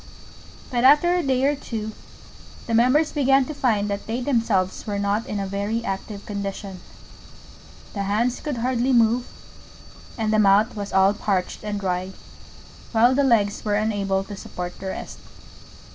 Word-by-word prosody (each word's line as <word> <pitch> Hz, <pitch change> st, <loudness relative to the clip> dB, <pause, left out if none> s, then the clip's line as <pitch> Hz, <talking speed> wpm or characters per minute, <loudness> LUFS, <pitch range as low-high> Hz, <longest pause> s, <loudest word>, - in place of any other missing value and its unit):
But 240 Hz, -1 st, 0 dB
after 300 Hz, +6 st, +6 dB
a 360 Hz, -, +2 dB
day 265 Hz, -4 st, 0 dB
or 290 Hz, +1 st, +2 dB
two 220 Hz, -6 st, -5 dB, 0.7 s
the 230 Hz, -, -3 dB
Members 255 Hz, +7 st, +3 dB
began 270 Hz, -2 st, +3 dB
to 305 Hz, -, -6 dB
find 225 Hz, -8 st, +1 dB
that 200 Hz, 0 st, -4 dB
they 230 Hz, +3 st, -2 dB
themselves 225 Hz, -9 st, 0 dB
were 205 Hz, -1 st, -2 dB
not 200 Hz, +2 st, -1 dB
in 205 Hz, -, -3 dB
a 195 Hz, -, -2 dB
very 200 Hz, +4 st, -2 dB
active 200 Hz, +1 st, -5 dB
condition: 200 Hz, -2 st, -5 dB, 1.1 s
the 200 Hz, -, -3 dB
Hands 220 Hz, +5 st, 0 dB
could 290 Hz, -4 st, -4 dB
hardly 250 Hz, +2 st, 0 dB
move, 235 Hz, +1 st, +3 dB, 0.9 s
and 220 Hz, -2 st, 0 dB
the 215 Hz, -, +3 dB
Mouth 210 Hz, +3 st, +4 dB
was 205 Hz, -1 st, -5 dB
all 190 Hz, +1 st, +4 dB
parched 200 Hz, -3 st, -2 dB
and 210 Hz, -1 st, -3 dB
dry, 185 Hz, 0 st, -2 dB, 0.8 s
while 235 Hz, +3 st, +5 dB
the 280 Hz, +2 st, +2 dB
Legs 215 Hz, -6 st, +2 dB
were 210 Hz, -1 st, 0 dB
unable 200 Hz, -2 st, 0 dB
to 205 Hz, +1 st, -8 dB
support 180 Hz, -2 st, -7 dB
the 195 Hz, -, -6 dB
rest. 190 Hz, -, -6 dB
215 Hz, 160 wpm, -23 LUFS, 200-250 Hz, 1.1 s, after